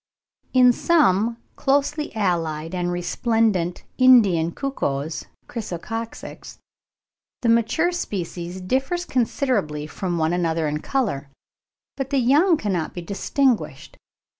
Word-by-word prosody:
In 250 -1 +6
some 230 - +2 0.2
closely 285 +2 0
allied 165 -5 -1
and 175 -1 -1
resplendent 180 0 0 0.2
Indian 205 -11 +5
cuckoos 155 - -3 0.2
(Chrysococcyx), 225 +1 -6 0.9
the 235 - +2
mature 235 +10 +2
species 180 - -4
differ 265 - 0
considerably 225 - 0
from 175 +2 -3
one 160 +1 +1
another 165 -2 0
in 150 0 -2
colour, 200 - -2 0.7
but 270 -1 -3
the 280 - +1
young 295 +8 +4
cannot 185 - -2
be 175 - -5
distinguished. 240 +6 -1
205 Hz, 105 wpm, -23 LUFS, 170-260 Hz, 0.9 s, In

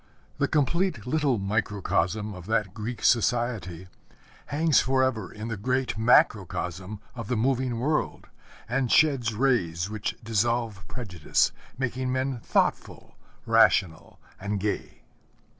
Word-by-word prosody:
The - - +2
complete 160 - 0
little 145 -2 +1
microcosm 105 0 -1
of 90 -1 -10
that 105 -4 0
Greek 115 +3 -6
society 115 -7 +1 0.6
hangs 155 0 +3
forever 130 -5 0
in 105 +1 -7
the 115 -2 -4
great 130 +4 -1
macrocosm 100 -4 +1
of 115 -5 -7
the 125 - -1
moving 125 0 0
world, 150 +5 -1 0.4
and 125 +1 0
sheds 135 -7 +4
rays 100 -8 +1
which 110 -1 -3
dissolve 115 -2 -1
prejudice, 90 -11 0 0.3
making 130 0 -2
men 130 -1 -1
thoughtful, - - -1 0.3
rational, 80 -3 +2 0.2
and 100 +1 -2
gay. 105 +1 -4
115 Hz, 115 wpm, -26 LUFS, 100-130 Hz, 0.6 s, sheds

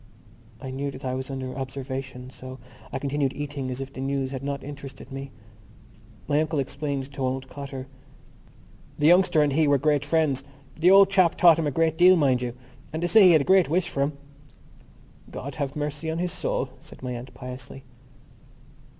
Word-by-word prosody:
I 130 - -6
knew 140 +2 -3
that 135 -1 -9
I 130 - -1
was 130 +1 -4
under 130 -1 -5
observation 130 -1 -6
so 130 0 -9 0.3
I - - -2
continued 140 0 -1
eating 140 -2 -4
as 130 0 -4
if 135 0 -6
the 130 - -6
news 135 -1 -1
had 135 -2 -5
not 140 0 -4
interested 140 -1 -9
me. 135 0 -6 1.0
My 145 +1 +2
uncle 155 0 -1
explained 140 0 -3
to 135 - -7
old 130 0 -2
Cotter. 135 -2 -7 1.1
"The 150 - 0
youngster 175 -2 +5
and 145 -2 +1
he 155 +1 +3
were 145 -1 +4
great 145 0 +2
friends. 145 -3 +1 0.3
The 170 +3 +4
old 195 0 +7
chap 185 -4 +4
taught 170 -3 +6
him 160 - 0
a - - +2
great 160 +2 +1
deal, 180 +1 +8
mind 135 -6 +2
you; 120 -1 -4 0.4
and 160 +2 -3
they - - +2
say 205 +3 +6
he 175 - +7
had 155 - +5
a - - 0
great 190 -1 +4
wish 180 +3 +1
for 140 - -2
him." 140 +1 -1 1.1
"God 140 +1 -6
have 140 -1 -2
mercy 150 +1 -3
on 160 - -2
his 180 +1 -1
soul," 130 - -1
said - - -15
my 125 - -3
aunt 120 +2 -7
piously. 125 +1 -9
140 Hz, 195 wpm, -25 LUFS, 130-155 Hz, 1.1 s, deal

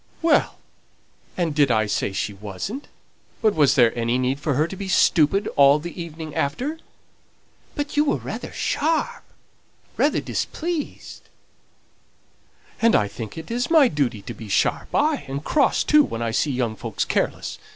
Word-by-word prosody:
"Well, 330 - +3 0.8
and 170 -4 0
did 145 -2 +3
I 110 -2 +2
say 105 -1 -1
she 100 +2 -3
wasn't? 105 - -6 0.5
but 215 -2 +3
was 145 -3 +4
there 120 -4 +4
any 120 +1 0
need 130 +2 0
for 145 -2 -1
her 155 +4 +2
to 190 - -7
be 195 0 -6
stupid 190 +1 +3
all 140 0 +6
the 170 +3 -7
evening 160 -2 -7
after?" 265 - -2 1.0
"But 290 0 -4
you 295 +1 +3
were 290 - +2
rather - - -6
sharp, 315 +2 -1 0.7
rather - - +2
displeased 335 -2 -4 0.8
" - - -31
"And 230 0 +5
I 105 - +3
think 105 +3 -8
it 230 +10 -3
my 315 -5 +6
duty 125 -8 -1
to - - -7
be 110 -2 -10
sharp, 95 - 0
ay, 300 0 +2
and 140 +2 -5
cross 285 - +2
too, 300 0 +5
when 115 - -4
I 115 - -1
see 145 - +1
young 125 -4 -1
folks - - -3
careless. - - -2
150 Hz, 160 wpm, -23 LUFS, -, 1.0 s, all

